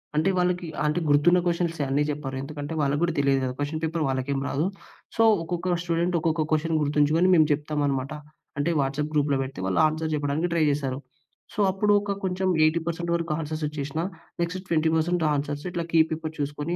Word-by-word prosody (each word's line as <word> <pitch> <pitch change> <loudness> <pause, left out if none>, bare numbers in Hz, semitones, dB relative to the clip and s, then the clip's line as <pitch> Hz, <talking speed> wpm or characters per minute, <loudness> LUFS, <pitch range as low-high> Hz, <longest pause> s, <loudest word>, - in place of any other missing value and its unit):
అంటే 155 +5 +2
వాళ్ళకి 180 -1 0 0.2
అంటే 150 +3 +1
గుర్తున్న 150 +5 +5
కొషన్సే. 170 -3 0
అన్నీ 140 +2 +2
చెప్పరు. 145 -2 -5
ఎందుకంటే, 145 +2 -6
వాళ్ళకి 145 0 +1
గూడా 170 -1 +1
తెలియదు 140 -1 +2
కదా! 130 -1 -2
కొషన్ 150 +2 -2
పేపర్ 160 0 -1
వాళ్ళకేం 135 +1 -1
రాదు. 150 +4 0 0.5
సో, 225 - +5 0.2
ఒక్కొక్క 175 +1 -1
స్టూడెంట్, 170 +1 0
ఒక్కొక్క 160 0 +1
కొషన్ 160 +1 +1
గుర్తుంచుకొని 150 +4 +3
మేం 160 - +6
చెప్తామనమాట. 145 -2 -1 0.5
అంటే, 145 - +1
వాట్సప్ 140 +3 -2
గ్రూప్‌లో 145 -2 +2
పెడితే, 130 -6 -8
వాళ్ళు 95 - +2
ఆన్సర్ 155 +1 -3
చెప్పడానికి 145 +3 0
ట్రై 165 -2 +2
జేస్తారు. 140 -2 -1 0.5
సో, - - -7
అప్పుడు 205 +2 +1
ఓక 205 0 -4
కొంచెం 190 0 -1 0.2
80% 170 +2 0
వరకు 170 -1 -2
ఆన్సర్సొచ్చేసినా, 150 -1 -3 0.4
నెక్స్ట్ 170 +2 -2
20% 160 +1 +1
ఆన్సర్స్ 145 +1 -3
ఇట్లా 175 -1 -3
కీ 165 - +4
పేపర్ 160 0 -4
చూసుకొని, 145 +4 -2
155 Hz, 170 wpm, -25 LUFS, 145-170 Hz, 0.5 s, మేం